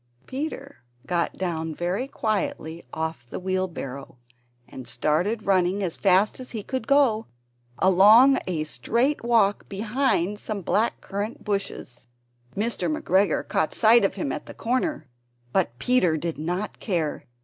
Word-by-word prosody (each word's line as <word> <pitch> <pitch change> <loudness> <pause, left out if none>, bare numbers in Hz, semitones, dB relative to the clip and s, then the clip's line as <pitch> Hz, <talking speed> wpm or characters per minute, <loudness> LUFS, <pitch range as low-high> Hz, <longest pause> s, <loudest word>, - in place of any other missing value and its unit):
Peter 275 0 -5 0.3
got 170 +2 -1
down 160 -3 -3
very 180 - -2
quietly 195 - -2
off 160 -5 -4
the - - -5
wheelbarrow, 180 -9 -4 0.5
and 130 -2 -10
started 175 - 0
running 190 0 +2
as 175 -4 -2
fast 195 +4 +3
as 255 - -8
he 220 -3 -5
could 260 -1 -4
go, 255 -6 +3 0.5
along 215 +9 +6
a 165 -4 -1
straight 235 - 0
walk 225 -4 +2
behind 210 -2 0
some 210 -3 -5
black 220 +7 +1
currant 205 +4 -5
bushes. 195 -12 -4 0.5
Mr. 225 +7 -1
McGregor 200 - +1
caught 155 - 0
sight 230 +1 +6
of 195 - +1
him 175 -8 -2
at 150 - -5
the - - -10
corner, 255 - -1 0.5
but 120 - 0
Peter 180 - +2
did 165 0 -4
not 180 +6 -3
care. 170 -8 -2
195 Hz, 140 wpm, -25 LUFS, 170-230 Hz, 0.5 s, along